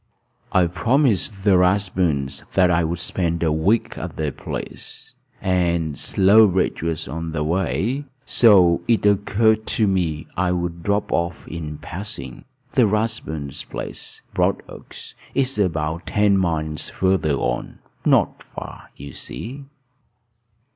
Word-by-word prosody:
"I 90 -1 +4
promised 100 - +1
the 95 -3 +5
Rathburns 90 -7 +1
that 90 -2 +5
I 85 0 +2
would 85 +2 -1
spend 85 -1 0
a 80 - +2
week 95 +9 +1
at - - -6
their 75 -2 -2
place; - - -7 0.3
and 85 -4 0
Slowbridge 95 - +4
was 80 -1 -2
on 80 +1 -5
the 75 -2 -1
way, 95 - -1 0.2
so 95 -8 +5
it 115 -3 +2
occurred 110 +2 +2
to 110 - +4
me 85 -6 0
I 90 0 +1
would 85 -1 -3
drop 100 +4 0
off 85 -1 -2
in 75 -2 -6
passing. 75 - -8 0.3
The 125 -4 +4
Rathburns' 100 -10 -2
place, - - -6
Broadoaks, - - -3 0.2
is 135 -4 0
about 80 -3 -1
ten 105 -1 +3
miles 80 -4 -1
farther 95 -6 +1
on; - - -3 0.3
not - - +2
far, - - -10
you 70 -1 -10
see." 135 +5 -7
90 Hz, 125 wpm, -22 LUFS, 80-105 Hz, 0.3 s, the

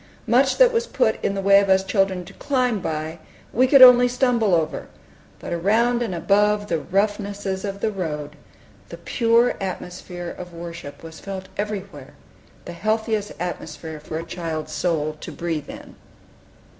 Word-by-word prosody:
Much 260 +3 +3
that - - +6
was 465 +1 0
put - - 0
in 195 - 0
the 195 - -3
way 200 0 +7
of 200 -1 0
us 190 0 +4
children 195 -2 0
to - - -13
climb 255 -6 0
by, 160 -1 -4 0.3
we 255 +3 +4
could 270 0 +8
only 250 -1 +9
stumble 245 -6 +2
over; 160 -2 -2 0.5
but - - -6
around 225 +8 +2
and 215 -7 -2
above 205 +4 +2
the 165 - 0
roughnesses 200 +1 -2
of 200 -1 -5
the 220 - 0
road, 150 -6 -5 0.5
the - - -8
pure 235 0 +2
atmosphere 180 -1 -6
of 180 -1 -10
worship 165 -4 -9
was 160 0 -10
felt 190 -1 -7
everywhere, 195 -10 -6 0.5
the - - -7
healthiest 215 +2 -1
atmosphere 165 -2 -6
for 155 +1 -6
a 165 - -4
child's 165 -2 -5
soul 155 -2 -1
to - - -7
breathe 165 -4 -4
in. - - -10
195 Hz, 160 wpm, -22 LUFS, 170-220 Hz, 0.5 s, only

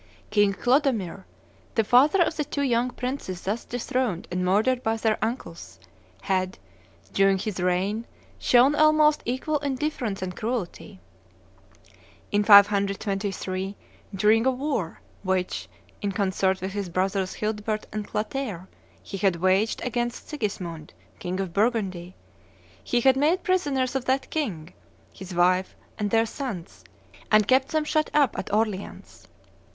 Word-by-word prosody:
King 205 -2 +3
Clodomir, 245 - +1 0.5
the 225 - +3
father 280 - +5
of 320 - -2
the 300 - -1
two 285 -1 -3
young 245 -2 +1
princes 250 -7 -5
thus 210 +5 -2
dethroned 245 -5 -2
and 180 +1 -1
murdered 220 +7 +2
by 225 -1 0
their 220 -1 0
uncles, 195 - -5 0.4
had, 185 -1 -1 0.6
during 195 0 +4
his 200 0 -4
reign, 190 +5 0 0.3
shown 250 +3 +5
almost 305 0 +4
equal 260 +5 -1
indifference 265 -7 -2
and 180 -1 -5
cruelty. 220 - -4 1.3
In 205 0 +2
523, 200 -1 +3 0.4
during 215 +5 +3
a - - +6
war 260 - -2 0.2
which, 185 -1 -2 0.3
in 205 - -1
concert 190 -1 0
with 190 +1 -3
his 200 -2 -4
brothers 185 +1 -1
Childebert 215 0 -2
and 215 -1 -4
Clotaire, 215 -5 -3 0.4
he 195 - -6
had 190 -2 +2
waged 185 +5 +1
against 240 -1 -3
Sigismund, 180 - -5 0.2
king 180 +1 -3
of 190 -3 -3
Burgundy, 195 -5 -1 0.7
he 245 - +1
had 265 +1 +5
made 310 +7 +2
prisoners 285 -10 0
of 265 -2 -1
that 265 +1 0
king, 185 - -3 0.4
his 185 -1 -9
wife, 180 +2 +2 0.2
and 205 -1 0
their 225 +2 +3
sons, 220 - -6 0.5
and 215 -1 +5
kept 260 +3 +4
them 310 0 0
shut 305 0 0
up 285 -6 +3
at - - -5
Orleans. 210 -2 -3
215 Hz, 135 wpm, -25 LUFS, 190-255 Hz, 1.3 s, a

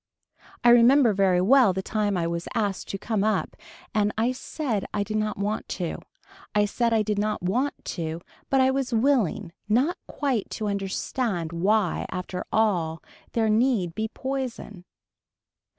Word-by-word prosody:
I 240 - +6
remember 240 0 +6
very 190 -2 +3
well 235 0 +5
the 190 +1 -3
time 205 -2 0
I 170 - 0
was 170 0 -3
asked 205 -4 -1
to 195 - -4
come 210 0 -1
up 215 0 0 0.4
and 210 -2 +2
I 230 +3 +2
said 255 -5 -3
I 205 - +1
did 215 +1 -3
not 215 0 -1
want 205 +2 -2
to. 175 -3 -3 0.6
I 210 0 +4
said 235 +3 0
I 220 -1 +3
did 210 -1 -1
not 210 -2 -1
want 250 +10 0
to 165 -1 -4 0.3
but 270 - +3
I 260 0 +4
was 265 -1 -1
willing 230 - +1 0.2
not 265 +11 +2
quite 265 -8 -1
to 215 - -3
understand 195 -2 -2
why 195 +2 +1
after 180 0 -4
all 175 -8 +1 0.3
there 225 -1 +2
need 215 -5 +2
be 220 +4 -2
poison. 250 -7 -5
215 Hz, 160 wpm, -25 LUFS, 190-240 Hz, 0.6 s, I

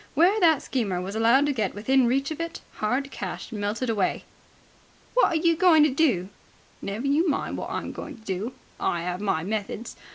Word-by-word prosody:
Where 360 +8 +4
that 325 -6 +4
schemer 205 -9 -1
was 190 +3 -5
allowed 235 +5 +4
to 290 - +1
get 215 -7 -2
within 255 +4 +3
reach 275 +4 0
of 315 - -5
it, 335 0 -5 0.2
hard 260 +6 -1
cash - - -6
melted 215 +3 -2
away. 210 -5 0 0.9
"What - - +5
are - - -1
you 335 +1 +3
going 325 -3 +6
to 300 - +3
do?" 250 - +1 0.5
"Never 210 +6 -4
you 305 +5 +2
mind 280 - -1
what - - -5
I'm - - -4
going - - -8
to 220 - -20
do. 200 +6 -3 0.3
I 170 0 -1
'ave 180 +3 -3
my 160 -6 0
methods. 210 +3 -4
245 Hz, 195 wpm, -25 LUFS, 205-300 Hz, 0.9 s, going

